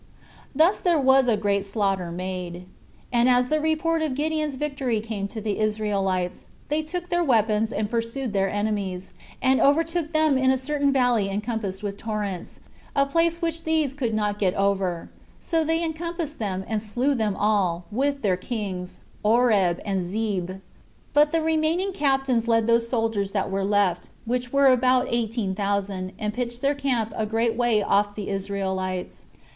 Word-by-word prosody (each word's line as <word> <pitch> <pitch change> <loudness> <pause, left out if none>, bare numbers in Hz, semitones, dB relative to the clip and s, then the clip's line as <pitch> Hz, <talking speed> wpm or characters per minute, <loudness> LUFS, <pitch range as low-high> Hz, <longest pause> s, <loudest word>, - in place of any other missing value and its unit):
Thus 330 +8 +4
there 345 -3 +2
was 265 -2 +4
a 225 -3 +3
great 200 -1 0
slaughter 195 -3 -1
made. 180 0 -5 0.5
And 240 +1 +4
as 250 0 +3
the 310 - +2
report 315 +1 +1
of 305 -5 -1
Gideon's 305 0 -1
victory 270 -5 -1
came 210 -2 -4
to 220 - -7
the 210 -1 -2
Israelites, 200 -4 -1 0.2
they 300 +2 +1
took 350 +3 -5
their 350 -1 +2
weapons 220 -5 +2
and 215 - -1
pursued 230 +2 -2
their 195 -1 +1
enemies, 205 -3 -2 0.3
and 260 0 +4
overtook 325 +2 +2
them 310 -4 +3
in 260 0 +3
a 265 - +3
certain 285 +1 +1
valley 245 -6 +2
encompassed 210 -1 -3
with 200 -1 -4
torrents, 210 -5 -4 0.3
a 275 - +4
place 335 +3 +1
which 330 0 -1
these 315 -4 +1
could 245 -6 -2
not 210 -1 -1
get 185 -3 +1
over; 195 -3 0 0.3
so 330 -1 0
they 325 +2 0
encompassed 325 -2 -4
them, 190 -3 -3
and 220 -2 -1
slew 245 +6 0
them 215 -6 0
all, 195 -5 +1
with 275 +5 -1
their 190 -3 +2
kings, 190 -4 -5 0.2
Oreb 210 -6 +3
and 195 -2 0
Zeeb. 190 -1 -3 0.5
But 295 0 +5
the 330 - +1
remaining 320 +4 +1
captains 270 - +1
led 225 -1 +3
those 230 0 +2
soldiers 225 -5 -1
that 195 -2 -1
were 195 0 -1
left, 195 -3 +1 0.2
which 245 +1 -2
were 280 0 +4
about 255 0 +3
eighteen 225 -4 -1
thousand, 195 -2 -2
and 210 0 -3
pitched 240 0 -4
their 280 +1 +2
camp 255 -6 -1
a 220 - -1
great 225 +1 +1
way 235 -3 +2
off 205 +1 +1
the 210 - -5
Israelites. 190 -2 -3
225 Hz, 170 wpm, -24 LUFS, 200-275 Hz, 0.5 s, But